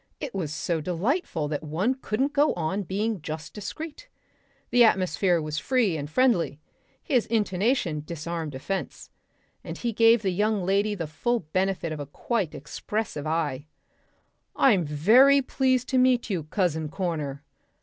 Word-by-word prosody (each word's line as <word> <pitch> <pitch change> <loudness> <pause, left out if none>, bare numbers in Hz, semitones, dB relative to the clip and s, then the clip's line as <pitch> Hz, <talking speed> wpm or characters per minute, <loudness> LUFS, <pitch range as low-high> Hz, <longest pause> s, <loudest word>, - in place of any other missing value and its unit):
It 280 - -5
was 175 -7 -3
so 160 +1 -2
delightful 180 - -1
that 150 -1 -2
one 165 - 0
couldn't 265 +2 -2
go 295 +1 +3
on 175 +4 -1
being 200 +1 -2
just 155 0 -6
discreet. 310 - -7 0.6
The 245 0 +6
atmosphere 185 -4 +3
was 155 -1 -3
free 235 - +1
and 145 -1 -4
friendly. 195 - +2 0.4
His 255 -8 +1
intonation 205 - 0
disarmed 165 -1 -5
offence. 190 +9 -5 0.5
And - - -6
he 235 -2 -2
gave 225 +1 +5
the 190 - +1
young 205 0 0
lady 200 +2 +1
the 170 -4 -3
full 230 +11 -1
benefit 185 +1 -1
of 155 - -5
a 145 - -5
quite 195 - -2
expressive 155 +1 -4
eye. 155 -3 -1 0.9
"I'm 200 -11 +4
very 225 - +5
pleased 260 -1 +1
to 260 - +2
meet 255 -3 +3
you, 170 -6 -2
Cousin 160 -3 -1
Corner. 150 -6 -3
190 Hz, 150 wpm, -26 LUFS, 155-235 Hz, 0.9 s, The